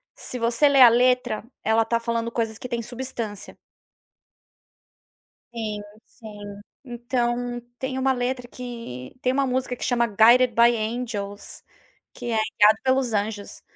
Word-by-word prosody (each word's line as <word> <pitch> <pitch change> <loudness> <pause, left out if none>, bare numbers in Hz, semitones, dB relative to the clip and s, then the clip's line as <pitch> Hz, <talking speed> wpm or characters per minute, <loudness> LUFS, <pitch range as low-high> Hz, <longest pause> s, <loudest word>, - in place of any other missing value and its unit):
se 255 - -6
você 235 +5 +3
lê 275 -2 +5
a 245 - +11
letra, 245 -2 +2 0.2
ela 220 +1 +3
está 235 +1 0
falando 230 0 -2
coisas 225 -2 -2
que 250 - -8
têm 235 -1 -2
substância. 240 -3 -6 2.0
Sim, 215 -3 -4 0.2
sim. 205 -3 -11 0.2
Então 240 -1 -2 0.2
tem 260 0 -3
uma 265 0 +2
letra 250 0 -3
que 230 - -8
tem 255 - +1
uma 275 +1 +1
música 255 0 -1
que - - -8
chama 235 -1 +2
Guided 235 +4 +5
By 235 +1 +5
Angels, 215 -3 -5 0.5
que 240 -1 -5
é 220 - +1 0.2
Guiado 210 +1 +7
Pelos 260 -2 +1
Anjos, 205 0 -3
235 Hz, 140 wpm, -24 LUFS, 220-250 Hz, 2.0 s, a